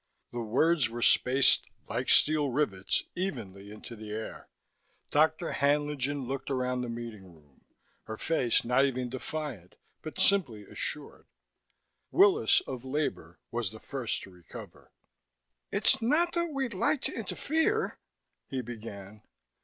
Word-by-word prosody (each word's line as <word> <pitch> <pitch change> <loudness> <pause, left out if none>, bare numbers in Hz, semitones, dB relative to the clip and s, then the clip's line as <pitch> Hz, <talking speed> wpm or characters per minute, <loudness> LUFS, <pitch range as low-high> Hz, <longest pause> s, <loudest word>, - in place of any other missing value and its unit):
The 120 - -4
words 130 +4 +3
were 120 +1 -4
spaced, 130 +2 +5 0.2
like - - -2
steel 150 -2 +5
rivets, 115 -8 0
evenly 105 - -4
into 110 +3 -9
the 110 -1 -9
air. 110 +1 -6 0.6
Dr. 160 +3 +3
Haenlingen 145 -1 +1
looked 135 +1 -4
around 125 -1 0
the 125 - -4
meeting 110 -6 -7
room, 75 -4 -25 0.4
her 110 - -6
face 130 -8 +2
not 125 +3 +4
even 130 -2 0
defiant 130 - -5 0.3
but 155 - -7
simply 135 - +3
assured. 145 +8 -6 0.8
Willis, 395 0 +5
of 125 - -6
Labor, 130 - -3
was 120 -4 -1
the 110 +2 -11
first 130 -3 -3
to 95 - -11
recover. 90 -2 -12 0.8
"It's - - +3
not 310 +9 +2
that 340 0 +1
we'd 270 -5 -2
like 285 +9 +1
to - - -1
interfere 425 +9 0 0.2
" - - -52
he 130 -1 -2
began. 105 -3 -9
130 Hz, 135 wpm, -30 LUFS, 110-155 Hz, 0.8 s, spaced